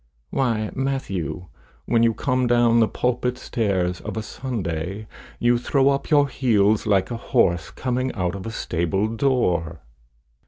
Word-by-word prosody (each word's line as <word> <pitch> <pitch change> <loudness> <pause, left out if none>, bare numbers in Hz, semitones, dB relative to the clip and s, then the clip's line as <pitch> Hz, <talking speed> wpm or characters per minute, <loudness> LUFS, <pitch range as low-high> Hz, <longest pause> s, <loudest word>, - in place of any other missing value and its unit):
"Why, 115 -5 0
Matthew, 115 -11 -3 0.4
when 115 -1 +2
you 115 -1 +3
come 130 -2 0
down 120 -1 +4
the 110 - +4
pulpit 125 +1 -1
stairs 95 -8 -1
of - - -6
a 110 - -2
Sunday, 100 -5 -4 0.3
you 120 0 +2
throw 135 +2 +2
up 140 0 -1
your 145 -2 +5
heels 110 -6 +2
like 100 +1 +2
a 120 - -2
horse 85 - +1
coming 130 0 -2
out 90 -4 -1
of 100 +2 -6
a - - -4
stable 90 0 -1
door." 110 - 0
115 Hz, 150 wpm, -23 LUFS, 95-125 Hz, 0.4 s, your